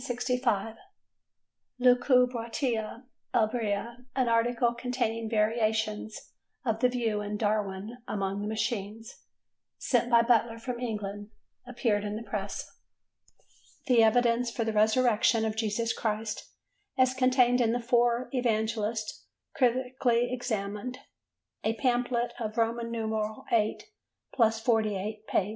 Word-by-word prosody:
"Lucubratio 245 -2 +2 0.3
Ebria," 230 +1 -1
an 260 -2 +2
article, 235 +1 +2
containing 235 -2 -2
variations 220 -1 -1 0.3
of 225 -2 0
the 250 +1 +4
view 230 -4 -1
in 210 0 -3
"Darwin 210 +1 -2
among 195 -1 -2
the 205 - -3
Machines," 220 0 -4 0.6
sent 245 -2 +1
by 235 -1 +6
Butler 230 -1 +2
from 240 +1 -5
England, 205 -3 -4 0.4
appeared 230 -4 0
in 210 0 -3
the 220 - -5
Press. 200 -1 -5 1.1
The 250 -4 +5
Evidence 235 +1 +3
for 235 0 -2
the 225 -1 -2
Resurrection 220 +1 +3
of 215 -1 -2
Jesus 225 +1 -1
Christ 215 -1 -3 0.5
as 255 0 +4
contained 255 -1 +3
in 225 -2 +3
the 240 - 0
Four 240 0 +2
Evangelists 220 -3 -1 0.3
critically 250 -1 +1
examined: 225 0 -3 0.7
a 220 +1 0
pamphlet 245 -1 0
of 215 -2 -4
VIII+48 225 -2 -1 1.4
pp. 195 - +1
230 Hz, 105 wpm, -29 LUFS, 215-245 Hz, 1.4 s, by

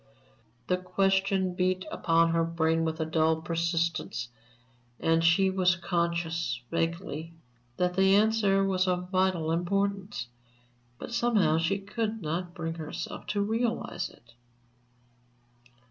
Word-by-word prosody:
The 180 - +1
question 190 0 +1
beat 185 +1 0
upon 165 -1 +2
her 165 0 +2
brain 165 0 +1
with 160 0 -2
a 160 - 0
dull 160 0 +2
persistence, 165 -6 -1 0.7
and 165 0 +2
she 190 +3 +4
was 185 -1 +3
conscious, 170 -5 -1
vaguely, 165 -1 -3 0.4
that 180 0 +1
the 190 +1 +5
answer 205 -2 +3
was 190 -1 +1
of 180 0 -1
vital 185 -4 +1
importance, 195 - -1 0.7
but 235 - -8
somehow 210 -10 +3
she 165 +4 +1
could 215 +2 -3
not 175 +1 -4
bring 165 -1 -3
herself 160 -2 -6
to 205 - 0
realize 230 +3 -1
it. 115 0 -21
180 Hz, 120 wpm, -28 LUFS, 165-195 Hz, 0.7 s, the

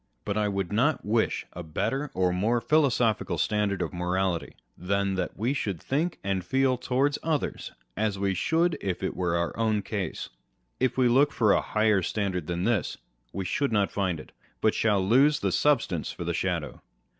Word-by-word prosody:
But 100 - -2
I 105 -1 +1
wrould 95 -3 -2
not 125 +9 +1
wish 110 +2 0
a 90 - -6
better 135 - -2
or 90 -1 +2
more 110 +7 +1
philosophical 120 - +2
standard 105 +2 0
of - - -5
morality 90 0 -1 0.2
than 100 +2 -1
that 95 -1 -3
we 120 +6 0
should 100 - -2
think 155 - -1
and 95 -2 -1
feel 130 +4 +2
towards 130 +3 0
others 155 -3 -2 0.2
as 105 -1 -1
we 100 0 0
should 160 - +1
if 95 -1 -3
it 95 - -2
were 85 -2 0
our 85 -1 -2
own 110 -2 +1
case. 100 -4 -4 0.5
If 130 -1 +1
we 130 -1 +4
look 135 +4 +4
for 110 -4 +3
a - - +3
higher 110 -2 +2
standard 90 -3 -2
than 85 0 -2
this, 110 -2 0 0.3
we 95 - -4
shall 140 +10 0
not 105 -5 +1
find 95 -5 -1
it; - - -12 0.3
but 110 - +2
shall 100 -4 +1
lose 140 +7 +4
the - - 0
substance 135 - +1
for - - -6
the - - -2
shadow - - -2
105 Hz, 185 wpm, -27 LUFS, 95-125 Hz, 0.5 s, we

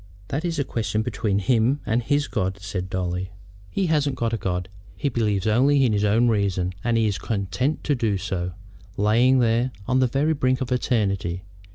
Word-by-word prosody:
"That 145 +4 -2
is 170 -2 -2
a 140 - +1
question 110 -4 -2
between 105 -3 -1
him 115 +6 +2
and 115 +3 +1
his 145 +4 0
God," 95 -4 -2
said 95 -2 -4
Dolly. 90 0 -2 0.4
"He 195 - -1
hasn't 145 -4 +1
got 115 -2 -1
a - - +1
God. 90 -2 -2 0.3
He 140 - -1
believes 105 -6 0
only 135 +5 +4
in 115 - +2
his 105 0 +1
own 110 +4 +3
reason, 95 -4 0
and 120 -1 +1
is 110 -3 +1
content 110 - -2
to 150 - +1
do 115 -6 0
so, 90 -1 -3 0.4
lying 115 +6 +4
there 120 +1 +2 0.2
on 130 0 +2
the 130 - +4
very 140 +6 +1
brink 130 -3 +1
of 130 -2 -4
eternity. 100 -8 0
115 Hz, 190 wpm, -24 LUFS, 100-130 Hz, 0.4 s, only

